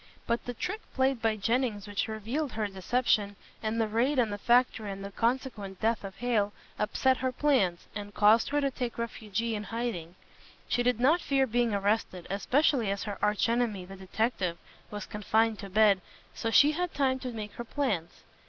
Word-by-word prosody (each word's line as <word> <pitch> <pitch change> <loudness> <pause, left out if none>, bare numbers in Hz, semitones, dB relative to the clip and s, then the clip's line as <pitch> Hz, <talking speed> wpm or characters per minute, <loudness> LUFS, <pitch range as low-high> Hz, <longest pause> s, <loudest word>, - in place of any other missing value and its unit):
But 235 0 -1
the 245 - -5
trick 425 - -3
played 260 -2 +2
by 225 -1 +2
Jennings 215 -1 0
which 205 0 -1
revealed 230 +6 -3
her 220 -1 -1
deception, 205 +1 0 0.3
and 220 +1 -1
the 225 - +2
raid 240 +7 +1
on 235 -4 +2
the 205 - -4
factory 240 -2 +3
and 195 0 -6
the 200 - -7
consequent 230 -4 -2
death 225 0 +1
of 195 -1 -7
Hale, 220 -4 0 0.3
upset 255 +5 +2
her 260 0 -1
plans, 250 -11 +1
and 205 0 -6
caused 215 +3 +4
her 290 - +1
to 275 -1 +1
take 245 -2 -4
refuge 225 -2 -3
in 220 -3 -2
hiding. 225 -8 -4 0.5
She 245 - +1
did 245 -1 +2
not 305 +8 +4
fear 270 -1 +2
being 240 -2 +1
arrested, 200 -3 0
especially 245 +2 +2
as 200 0 -2
her 205 -3 -5
arch 210 +1 +2
enemy, 230 -5 0
the 195 +1 -10
detective, 190 -2 -1 0.3
was 210 0 -6
confined 220 +1 +1
to 200 - -7
bed, 205 -1 +4 0.3
so 225 - -2
she 290 +6 +6
had 355 +2 -2
time 265 -2 +2
to 255 -1 -5
make 215 -2 -6
her 240 - -6
plans. 220 - -2
225 Hz, 190 wpm, -29 LUFS, 205-250 Hz, 0.5 s, she